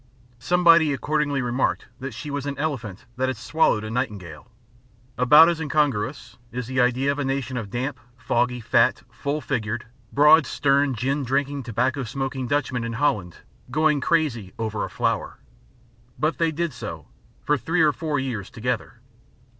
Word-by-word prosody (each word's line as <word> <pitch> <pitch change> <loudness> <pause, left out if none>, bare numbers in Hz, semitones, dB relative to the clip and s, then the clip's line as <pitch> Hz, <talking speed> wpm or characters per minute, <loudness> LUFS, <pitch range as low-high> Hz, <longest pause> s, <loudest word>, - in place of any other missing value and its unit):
Somebody 170 -1 +5
accordingly 145 -1 0
remarked 125 +2 0
that 130 -3 -6
she 150 - -6
was 145 0 -3
an 140 - -4
elephant 120 -8 -4
that 130 +1 +1
had 130 - -3
swallowed 155 -9 +1
a 110 - -5
nightingale. 100 - -4 0.7
About 150 +6 +7
as 170 -1 0
incongruous 145 -5 -1
is 125 0 -4
the 130 +1 0
idea 125 +3 +2
of 140 - -4
a - - 0
nation 135 -1 -2
of 115 -5 -4
damp, 130 +4 -3 0.2
foggy, 125 0 0
fat, - - +2
full 145 +2 -3
figured, 110 -4 -3 0.3
broad 150 0 +6
sterned, 140 -1 +2
gin 135 +4 -1
drinking, 140 +2 -1
tobacco 125 +3 -1
smoking 130 +1 -3
Dutchmen 130 -3 -1
in 115 0 -4
Holland, 105 - -1 0.3
going 155 +1 +2
crazy 125 - 0
over 110 -2 -2
a - - -4
flower. - - -2 0.8
But 155 +2 0
they 165 -1 +2
did 165 -1 -2
so, 85 - -7 0.4
for 150 - +2
three 165 +5 0
or 150 -2 +4
four 155 -2 -2
years 125 -7 -4
together. 120 0 -4
135 Hz, 160 wpm, -24 LUFS, 120-150 Hz, 0.8 s, About